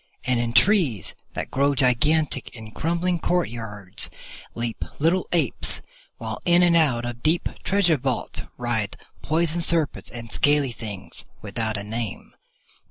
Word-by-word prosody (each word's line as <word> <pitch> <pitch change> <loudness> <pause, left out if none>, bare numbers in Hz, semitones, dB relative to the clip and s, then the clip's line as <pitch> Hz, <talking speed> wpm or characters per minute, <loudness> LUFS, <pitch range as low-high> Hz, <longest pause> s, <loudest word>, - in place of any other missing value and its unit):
And 125 -1 +1
in 120 -1 -1
trees 140 - +3 0.2
that - - -4
grow 140 +1 +2
gigantic 135 +3 +2
in 110 -2 -10
crumbling 170 +6 0
courtyards 115 - -1 0.5
leap 115 -1 -3
little 170 +5 +2
apes, 160 -8 0 0.3
while 110 -1 -5
in 175 0 +5
and 175 -1 +4
out 130 -8 +3
of 120 0 -5
deep 165 +2 +2 0.2
treasure 180 -4 +3
vaults 130 -1 0 0.2
writhe 120 -4 -1 0.3
poison 165 +2 0
serpents 165 -3 +3
and 115 -2 -8
scaly 145 -3 +2
things 105 -4 -4 0.2
without 110 +1 -2
a 100 - -4
name. 110 0 -5
130 Hz, 135 wpm, -24 LUFS, 115-165 Hz, 0.5 s, in